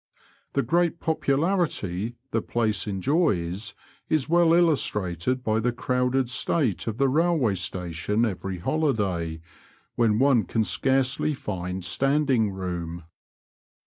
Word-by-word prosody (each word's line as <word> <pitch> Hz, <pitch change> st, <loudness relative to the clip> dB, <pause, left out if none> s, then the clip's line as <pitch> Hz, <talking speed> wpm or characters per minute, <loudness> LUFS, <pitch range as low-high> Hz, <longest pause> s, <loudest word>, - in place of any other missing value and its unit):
The 140 Hz, -, +1 dB
great 170 Hz, 0 st, +1 dB
popularity 140 Hz, -, 0 dB, 0.2 s
the 115 Hz, -, +1 dB
place 110 Hz, -2 st, -1 dB
enjoys 100 Hz, -, 0 dB, 0.3 s
is 155 Hz, -4 st, +1 dB
well 170 Hz, 0 st, +4 dB
illustrated 125 Hz, -, +1 dB
by 110 Hz, -1 st, +1 dB
the 120 Hz, +2 st, +1 dB
crowded 125 Hz, +1 st, 0 dB
state 125 Hz, -, 0 dB
of 110 Hz, -1 st, -2 dB
the 135 Hz, 0 st, +3 dB
railway 155 Hz, -, +2 dB
station 90 Hz, +3 st, -1 dB
every 95 Hz, -3 st, -4 dB
holiday, 95 Hz, -, -1 dB, 0.5 s
when 110 Hz, -3 st, +2 dB
one 130 Hz, -4 st, +4 dB
can 110 Hz, +5 st, 0 dB
scarcely 135 Hz, +5 st, +1 dB
find 90 Hz, -5 st, -5 dB
standing 135 Hz, +2 st, +1 dB
room. 85 Hz, -3 st, -5 dB
115 Hz, 115 wpm, -25 LUFS, 95-140 Hz, 0.5 s, well